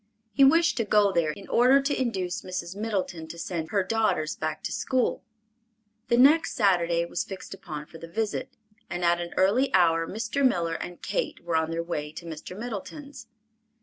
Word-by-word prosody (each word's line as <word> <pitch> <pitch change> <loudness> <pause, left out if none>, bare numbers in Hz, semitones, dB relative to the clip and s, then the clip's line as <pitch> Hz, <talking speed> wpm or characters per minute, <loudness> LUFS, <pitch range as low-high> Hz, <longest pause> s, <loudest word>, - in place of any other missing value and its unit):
He 275 - +5
wished 330 +5 +5
to 230 - +2
go 210 -1 +3
there 170 -4 +1
in 195 +6 -7
order 255 +3 +5
to 275 0 -1
induce 190 -6 -2
Mrs. 180 0 -5
Middleton 195 -6 -3
to 170 - -9
send 165 -1 -4
her 200 0 +1
daughters 190 -7 0
back 155 0 -4
to - - -3
school. 255 -1 0 0.8
The 235 - +3
next 290 +6 +5
Saturday 175 -5 +2
was - - -2
fixed 195 0 -8
upon 155 -6 -7
for 165 +1 -13
the 165 - -9
visit, 215 +5 -2 0.4
and 175 0 -2
at 170 0 +3
an 170 0 -5
early 215 +9 +3
hour 165 -2 +3
Mr. 225 +8 -2
Miller 170 -10 +2
and 175 +2 -7
Kate - - -2
were 170 -1 -2
on 160 0 +1
their 165 0 -2
way 150 -3 -4
to 170 - -9
Mr. 165 +3 -8
Middleton's. 245 +4 -7
185 Hz, 185 wpm, -27 LUFS, 170-230 Hz, 0.8 s, He